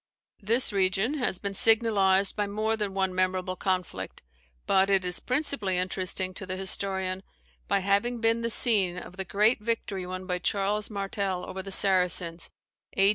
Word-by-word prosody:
This 225 +3 +2
region 195 +9 +1
has 240 -7 0
been 200 +1 -4
signalized 200 -3 +3
by 205 -1 -1
more 215 +2 -1
than 205 -3 -4
one 190 -1 0
memorable 185 0 -1
conflict; 185 -2 -3 0.4
but 190 0 +3
it 195 -2 +3
is 180 - 0
principally 250 -8 0
interesting 185 0 -1
to 190 0 -6
the 185 0 -4
historian, 190 -1 -2 0.5
by 200 -1 +1
having 200 +5 0
been 230 0 +1
the 230 - -1
scene 205 -7 +2
of 180 +1 -10
the 190 - -3
great 210 +6 +3
victory 210 -4 -3
won 185 0 -6
by 180 -1 -2
Charles 205 +3 0
Martel 195 -2 -3
over 190 - -5
the 195 +1 -9
Saracens, 180 -3 +2 0.5
A. 195 +1 +5
195 Hz, 165 wpm, -27 LUFS, 185-210 Hz, 0.5 s, A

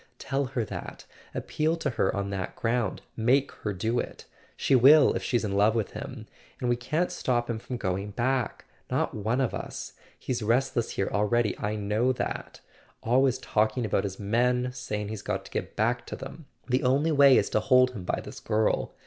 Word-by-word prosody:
Tell 135 +1 -1
her 125 -3 -2
that— - - -7 0.3
appeal 160 +2 0
to 150 -4 -1
her 115 - 0
on 100 0 -2
that 95 -2 -4
ground. 115 -3 -1
Make 130 +5 +2
her 105 - -1
do 110 +6 -1
it. - - -6 0.3
She - - +1
will 140 +4 +7
if - - -2
she's 120 -3 0
in 100 - -2
love 105 +3 +4
with 110 -3 -1
him. - - -7 0.3
And 125 - -1
we 120 - +3
can't 155 +9 -1
stop 120 -8 0
him 115 -2 -2
from 125 +2 -5
going 95 -1 -2
back—not 125 +4 -2
one 110 +4 -1
of 130 -3 0
us. - - -6 0.2
He's 125 -2 -3
restless 120 +2 +1
here 95 - -2
already—I 105 0 +1
know 105 +5 +1
that. - - -5 0.4
Always 130 +2 +3
talking 110 -1 0
about 100 -2 +1
his 95 -1 -4
men, 125 +4 +1
saying 105 -5 -4
he's 110 -1 -5
got - - -3
to - - -12
get - - -4
back 120 +3 0
to - - -5
them. 135 +2 -9 0.2
The 125 0 +1
only 140 +5 +2
way 140 -3 +7
is 100 - +1
to - - +3
hold 125 +2 +4
him 105 -7 -7
by - - -2
this - - -9
girl. 110 0 0
120 Hz, 190 wpm, -27 LUFS, 105-130 Hz, 0.4 s, will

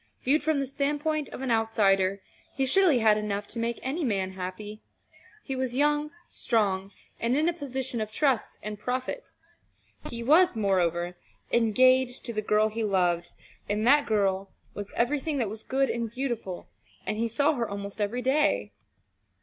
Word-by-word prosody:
Viewed 290 +5 +3
from 310 -1 +1
the 275 - 0
standpoint 295 +2 -1
of - - -8
an 255 - -1
outsider, 200 -4 +2 0.3
he 270 - +1
surely 345 0 +4
had 215 -2 +4
enough 205 -1 -3
to 235 - -5
make 235 0 -2
any 290 +6 -2
man 195 -7 0
happy. 190 +3 -7 0.6
He 270 - -4
was 260 -1 -2
young, 295 +2 +2 0.2
strong, 200 -4 0 0.3
and 235 +3 +1
in 310 +2 +2
a 345 - +2
position 265 -6 -4
of 215 0 -4
trust 265 -1 0
and 210 -1 -5
profit. 255 - -3 0.8
He 235 0 -5
was, 315 +2 +5
moreover, 175 -3 0 0.3
engaged 255 +2 +3
to 235 - -4
the 215 - -1
girl 215 +1 +2
he 225 +1 -3
loved, 175 -4 +1 0.4
and 210 +2 0
that 290 +4 +5
girl 195 -3 +1 0.2
was 205 0 -7
everything 290 +4 0
that 235 -6 0
was 215 +1 -7
good 270 +3 0
and 235 -1 -2
beautiful, 235 -7 -4 0.4
and 215 +2 -2
he 230 +1 0
saw 285 +7 +2
her 240 -5 -2
almost 200 +1 -6
every 235 +5 -1
day. 280 +4 +2
230 Hz, 165 wpm, -27 LUFS, 205-270 Hz, 0.8 s, was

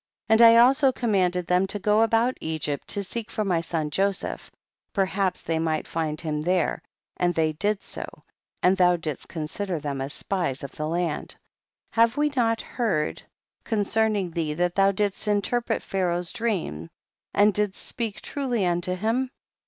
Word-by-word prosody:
And 220 0 +5
I 230 0 +9
also 265 +3 +6
commanded 185 -8 +1
them 180 +2 +2
to 205 - -1
go 210 +2 +3
about 225 +3 +3
Egypt 155 -3 -3
to 200 - 0
seek 220 +3 -5
for 215 - -2
my 175 -4 +1
son 160 -2 -2
Joseph, 195 +4 -1 0.4
perhaps 190 -1 0
they 165 0 -1
might 160 -1 -1
find 155 -2 -2
him 150 -2 -2
there, 175 0 0 0.4
and 175 -1 +1
they 160 -1 +2
did 205 +6 -1
so, - - -8 0.4
and 185 +1 +5
thou 180 -2 +4
didst 155 -4 -5
consider 175 +3 -3
them 140 -3 -4
as 135 +2 -3
spies 175 -10 -2
of 140 - -6
the 155 - -4
land. 170 -1 -2 0.6
33. 225 - +3
Have 230 +2 +4
we 295 0 +3
not 230 -3 +2
heard 190 -11 -1 0.4
concerning 210 -3 +1
thee 160 -2 -2
that 175 +1 0
thou 195 +1 +4
didst 205 +1 -1
interpret 210 +4 0
Pha* 195 - -3
raoh's 175 -1 0
dream 170 - -2 0.5
and 205 +1 +5
didst 205 -1 -1
speak 225 -3 -4
truly 250 -8 -1
unto 175 +1 0
him 225 +7 0
190 Hz, 170 wpm, -25 LUFS, 165-220 Hz, 0.6 s, I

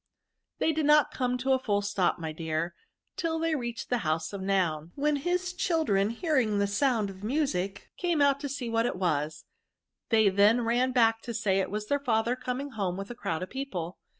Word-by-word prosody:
They 320 - +2
did 310 -1 0
not 300 0 +5
come 250 -1 0
to 265 +2 -1
a 260 - +2
full 205 -5 0
stop, 200 -3 +1
my 160 -2 -4
dear, 160 +1 -3 0.4
till 330 -3 -1
they 325 0 0
reached 240 -5 -4
the 245 - +2
house 160 0 -1
of 200 - -5
Noun; 175 -5 0
when 295 +1 +1
his 360 +5 -1
children, 310 - +1
hearing 235 - +1
the 200 - +2
sound 215 0 +1
of 190 +1 -13
music, 210 -7 -1
came 345 -3 0
out 280 -1 +4
to 285 - -4
see 265 -3 -4
what 230 +1 +1
it - - -2
was; 155 -4 -1 0.6
they 220 -3 +5
then 205 +5 +4
ran 240 +3 +1
back 225 -3 +3
to 235 - -6
say 205 -4 +1
that - - +3
it - - -11
was 210 +2 -3
their 285 +6 0
father 235 -2 +1
coming 255 +3 -4
home 190 -5 -2
with 195 +3 -6
a - - -7
crowd 165 -7 -3
of 185 - -8
people. 195 -11 -5
230 Hz, 210 wpm, -28 LUFS, 195-275 Hz, 0.6 s, not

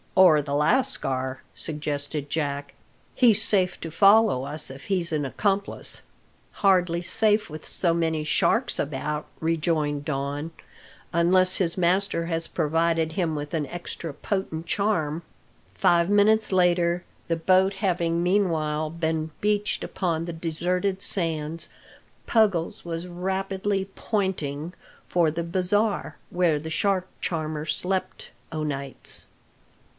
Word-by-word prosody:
"Or 175 -5 +7
the 140 0 -3
lascar," 135 - 0
suggested 145 -1 -3
Jack. 145 -2 -2 0.4
"He's 225 -4 +5
safe 185 -4 +1
to 165 - -5
follow 200 - +5
us 145 -1 -4
if 135 +1 -11
he's 185 -4 -1
an 150 -2 0
accomplice." 200 +8 -1 0.5
"Hardly 180 -3 +2
safe 210 +3 +2
with 155 - -8
so 170 -3 +1
many 160 -2 0
sharks 230 +10 +1
about," 150 +1 -2
rejoined 155 -3 0
Don, 145 +2 -3 0.6
"unless 185 +2 +3
his 170 -2 0
master 180 -1 +1
has 165 -1 -2
provided 165 +1 +1
him 165 -3 0
with 145 +1 -5
an 155 -3 -1
extra 170 0 -6
potent 165 0 -3
charm." 170 -5 0 0.5
Five 170 0 +3
minutes 210 +1 +4
later, 175 -1 +2 0.2
the 165 - 0
boat 185 +3 +3
having 175 -3 0
meanwhile 160 -5 +1
been 160 -1 -2
beached 210 0 0
upon 165 -3 -2
the 170 - -5
deserted 180 +4 -1
sands, 165 -3 -1 0.6
Puggles 200 -8 +1
was 170 0 -4
rapidly 190 +2 -2
"pointing" 175 -7 -2 0.3
for 170 -3 +3
the 170 +2 -3
bazaar, 190 +5 0
where 175 -4 +2
the 160 +2 -6
shark 185 +1 +1
charmer 155 -2 -2
slept 185 +3 -2 0.2
o' 155 -1 -3
nights. 140 -2 -2
170 Hz, 120 wpm, -25 LUFS, 155-190 Hz, 0.6 s, Or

